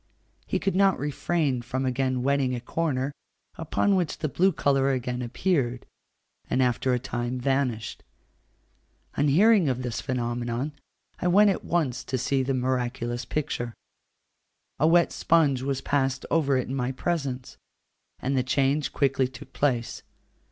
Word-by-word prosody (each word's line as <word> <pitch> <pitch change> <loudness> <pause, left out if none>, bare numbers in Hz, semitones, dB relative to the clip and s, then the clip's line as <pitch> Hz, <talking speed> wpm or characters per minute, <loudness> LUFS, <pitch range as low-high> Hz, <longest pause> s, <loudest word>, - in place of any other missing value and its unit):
He - - 0
could 195 - -1
not 195 -1 +4
refrain 145 -2 -1
from 130 +2 -3
again 130 0 0
wetting 135 -2 +1
a - - -3
corner, 135 0 -1 0.4
upon 180 +5 +1
which 175 -4 0
the 155 - -2
blue 185 +7 +3
colour 135 -4 +2
again 125 -1 -2
appeared, 125 -1 -1 0.6
and - - +1
after 125 +1 +1
a - - +1
time 125 0 -3
vanished. 130 -4 -1 1.1
On 145 - +2
hearing 190 +2 +5
of 130 0 -2
this 120 -3 -3
phenomenon, 120 +1 -2 0.5
I 180 - 0
went 200 +3 +6
at 190 - -3
once 155 -8 -1
to 130 - -2
see 135 +2 +1
the 130 +1 0
miraculous 125 -1 -2
picture. 120 -4 -3 1.0
A 155 - +4
wet 170 +1 +4
sponge 150 -6 +2
was 135 0 -2
passed 135 -2 0
over 140 -5 +3
it 130 - -2
in 130 - -4
my 130 -1 -1
presence, 135 -3 -3 0.6
and 135 +2 -2
the 130 - +3
change 135 +3 +1
quickly 135 -2 +2
took 130 +2 -13
place. 125 -5 0
135 Hz, 150 wpm, -26 LUFS, 125-150 Hz, 1.1 s, went